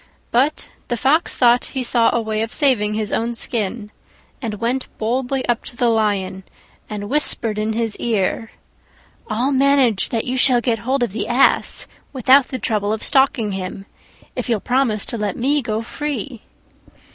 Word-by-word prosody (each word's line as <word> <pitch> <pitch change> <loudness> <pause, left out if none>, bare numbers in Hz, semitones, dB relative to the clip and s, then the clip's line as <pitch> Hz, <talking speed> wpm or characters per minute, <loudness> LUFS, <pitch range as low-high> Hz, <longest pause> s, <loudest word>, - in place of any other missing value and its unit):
But 270 +6 +1 0.2
the 240 - -2
Fox 300 +8 +2
thought 245 -1 +4
he 260 - 0
saw 235 -1 +3
a - - +1
way 220 -1 -2
of 225 +1 -3
saving 230 -8 +2
his 215 -1 -3
own 235 +1 -1
skin, 215 -2 -3 0.5
and 225 -4 -3
went 240 +5 -2
boldly 255 +4 -1
up 240 -1 0
to - - -8
the 240 -1 +1
Lion 200 -4 0 0.5
and 205 -1 -5
whispered 230 -5 +1
in 215 +1 -1
his 225 -1 0
ear, 225 0 -1 0.8
"I'll 240 +6 0
manage 265 -6 +3
that 225 -2 -2
you 255 +1 -2
shall 250 -1 +5
get 235 -2 -1
hold 255 +4 0
of 235 - -1
the 215 +2 -3
Ass 245 +3 +2 0.3
without 260 +1 +4
the 260 - -4
trouble 210 -4 -1
of 220 - -3
stalking 265 -6 +3
him, 190 0 -5 0.5
if - - -4
you'll 225 -3 +1
promise 245 -3 +1
to 235 - -4
let 205 -2 -2
me 285 +4 +1
go 220 -2 -3
free." 275 -2 -5
235 Hz, 170 wpm, -20 LUFS, 215-260 Hz, 0.8 s, shall